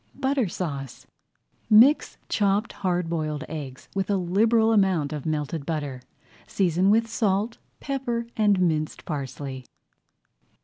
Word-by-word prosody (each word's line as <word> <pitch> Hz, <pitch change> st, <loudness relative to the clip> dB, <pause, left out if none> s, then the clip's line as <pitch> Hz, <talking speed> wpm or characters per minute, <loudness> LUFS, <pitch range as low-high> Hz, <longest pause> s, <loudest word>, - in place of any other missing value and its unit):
BUTTER 270 Hz, -3 st, 0 dB
SAUCE 140 Hz, -8 st, -5 dB, 0.6 s
Mix 240 Hz, +8 st, +5 dB
chopped 205 Hz, +2 st, +1 dB
hard 180 Hz, -3 st, -1 dB
boiled 155 Hz, -2 st, -2 dB
eggs 140 Hz, -5 st, -7 dB
with 195 Hz, 0 st, -2 dB
a 200 Hz, -, +2 dB
liberal 220 Hz, +5 st, +3 dB
amount 185 Hz, -8 st, +2 dB
of 150 Hz, 0 st, -5 dB
melted 155 Hz, 0 st, -2 dB
butter. 145 Hz, -4 st, -4 dB, 0.5 s
Season 185 Hz, 0 st, +2 dB
with 225 Hz, +2 st, +3 dB
salt, 220 Hz, 0 st, 0 dB, 0.2 s
pepper, 250 Hz, -4 st, -2 dB
and 205 Hz, -3 st, +3 dB
minced 155 Hz, -4 st, 0 dB
parsley. 135 Hz, -3 st, -5 dB
185 Hz, 120 wpm, -25 LUFS, 155-220 Hz, 0.6 s, Mix